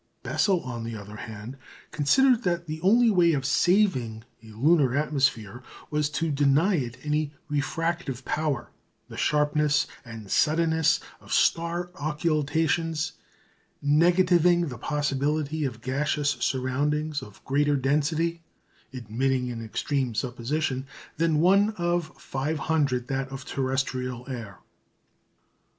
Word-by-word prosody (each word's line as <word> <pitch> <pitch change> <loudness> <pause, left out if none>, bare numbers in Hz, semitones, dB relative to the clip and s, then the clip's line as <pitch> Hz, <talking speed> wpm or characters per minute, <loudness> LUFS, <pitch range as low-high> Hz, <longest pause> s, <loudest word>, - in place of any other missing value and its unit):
Bessel, 190 -4 +1
on 120 -2 -6
the 115 0 -5
other 105 +1 -10
hand, 110 +4 -8 0.3
considered 235 - +3
that 175 -3 -1
the 155 0 -6
only 225 +5 +5
way 175 -4 +4
of 135 -2 -1
"saving" 145 - +2 0.2
a 115 - -15
lunar 135 +4 +2
atmosphere 130 -7 0 0.3
was 150 -1 +1
to 155 +2 -1
deny 145 +7 +3
it 125 -8 -2
any 150 0 -1
refractive 150 -2 -2
power, 150 -5 -2 0.4
the - - -9
sharpness 150 0 +2 0.2
and 110 -4 -10
suddenness 160 +1 +2 0.2
of - - -15
star 170 +1 +1
occultations 155 +1 0 0.7
negativing 175 +2 +4
the 125 -3 -8
possibility 150 +2 -1
of 120 -4 -5
gaseous 145 +3 0
surroundings 145 +4 -1
of 105 0 -13
greater 145 +2 +2
density 150 +5 0 0.5
(admitting 125 +1 -1
an 115 -1 -6
extreme 125 +2 -2
supposition) 130 +3 -2 0.3
than 160 -1 +2
1/500 160 - +1
that 135 +1 -3
of 135 0 -8
terrestrial 130 -2 -2
air. 115 -7 -7
145 Hz, 110 wpm, -26 LUFS, 130-165 Hz, 0.7 s, only